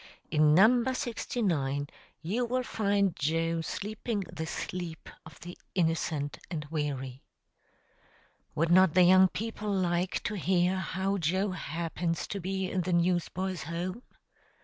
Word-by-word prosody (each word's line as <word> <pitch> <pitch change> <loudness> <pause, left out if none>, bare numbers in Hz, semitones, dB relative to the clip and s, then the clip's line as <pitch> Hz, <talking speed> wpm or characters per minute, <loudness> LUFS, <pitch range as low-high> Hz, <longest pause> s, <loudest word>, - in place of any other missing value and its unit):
In 150 0 +5
number 240 +7 +5
69 170 - -1 0.4
you 210 +10 0
will 255 +2 -1
find 200 -5 +1
Joe 165 +2 0
sleeping 210 +5 -3
the 160 -3 -6
sleep 170 -1 -5 0.2
of 160 - -14
the 175 +1 -8 0.2
innocent 160 -4 0
and 155 -4 -4
weary. 135 -4 -3 1.3
Would 165 +2 +1
not 185 -2 +6
the 185 - +7
young 185 +1 +7
people 215 +1 -4
like 180 -1 0
to - - -2
hear 185 -1 +1
how 190 +2 -1
Joe 185 +5 +1
happens 165 0 -3
to 200 - -3
be 190 +1 -2
in 185 - -1
the 180 +1 -1
Newsboys' 175 0 0
Home? 175 +7 -4
180 Hz, 130 wpm, -30 LUFS, 165-195 Hz, 1.3 s, the